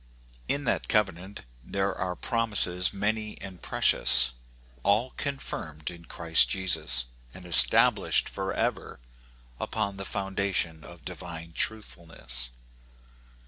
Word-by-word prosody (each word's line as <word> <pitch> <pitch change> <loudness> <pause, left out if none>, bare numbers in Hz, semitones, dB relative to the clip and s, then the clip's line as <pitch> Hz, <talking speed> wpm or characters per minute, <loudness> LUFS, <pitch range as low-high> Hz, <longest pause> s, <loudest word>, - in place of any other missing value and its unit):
In 145 - -1
that 120 - -1
covenant 95 -2 -1 0.2
there 100 +5 -2
are 90 -1 -4
promises 105 -7 +2
many 105 +2 -3
and 95 -2 -10
precious, 65 -3 +4 0.5
all 110 - +1
confirmed 85 - -5
in 85 -1 -13
Christ 80 -1 +2
Jesus, 75 -10 +2 0.3
and 90 - -12
estab - - +7
lished - - +1
forever - - -3 0.6
upon 100 -3 -3
the 100 - -6
foundation 95 -5 -2
of - - -14
divine 85 -1 -7
truthfulness. 80 - -2
95 Hz, 105 wpm, -27 LUFS, 80-105 Hz, 0.6 s, estab